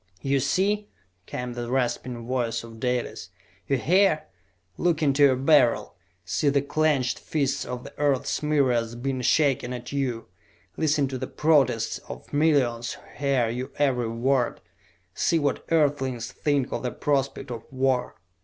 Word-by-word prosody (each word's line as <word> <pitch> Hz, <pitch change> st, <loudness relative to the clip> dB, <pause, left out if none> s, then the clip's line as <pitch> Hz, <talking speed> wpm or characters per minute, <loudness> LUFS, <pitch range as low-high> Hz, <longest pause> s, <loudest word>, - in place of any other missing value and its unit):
"You 135 Hz, 0 st, +2 dB
see?" 205 Hz, +8 st, 0 dB, 0.4 s
came 125 Hz, 0 st, -4 dB
the 120 Hz, 0 st, -5 dB
rasping 125 Hz, -2 st, -1 dB
voice 120 Hz, -2 st, -1 dB
of 115 Hz, -1 st, -11 dB
Dalis. 125 Hz, -7 st, -2 dB, 0.4 s
"You 135 Hz, -, +2 dB
hear? 165 Hz, -, +3 dB, 0.5 s
Look 165 Hz, -, +1 dB
into 140 Hz, 0 st, +2 dB
your 140 Hz, -2 st, +6 dB
Beryl! 135 Hz, -2 st, +3 dB, 0.3 s
See 100 Hz, -, +1 dB
the 140 Hz, 0 st, +2 dB
clenched 145 Hz, -4 st, +1 dB
fists 140 Hz, -4 st, -1 dB
of 125 Hz, 0 st, -5 dB
the -, -, -11 dB
earth's 140 Hz, -3 st, +1 dB
myriads 130 Hz, -6 st, +1 dB
being 130 Hz, +1 st, -2 dB
shaken 135 Hz, -2 st, +2 dB
at 125 Hz, 0 st, -7 dB
you! 130 Hz, -5 st, -2 dB, 0.5 s
Listen 150 Hz, -3 st, +1 dB
to 130 Hz, -1 st, -4 dB
the 130 Hz, -, -4 dB
protests 140 Hz, -7 st, +2 dB
of 60 Hz, 0 st, -8 dB
the -, -, -8 dB
millions 130 Hz, -6 st, +2 dB
who -, -, -13 dB, 0.2 s
hear 135 Hz, -4 st, +1 dB
your 125 Hz, +3 st, -4 dB
every 125 Hz, -5 st, +1 dB
word! 120 Hz, +2 st, 0 dB, 0.5 s
See 165 Hz, -, +1 dB
what 145 Hz, -3 st, 0 dB
Earthlings 135 Hz, -7 st, +1 dB
think 145 Hz, -3 st, 0 dB
of -, -, -2 dB
the 125 Hz, -, -1 dB
prospect 135 Hz, -1 st, -1 dB
of 115 Hz, -1 st, -6 dB
war!" 130 Hz, -1 st, 0 dB
135 Hz, 155 wpm, -25 LUFS, 120-145 Hz, 0.5 s, your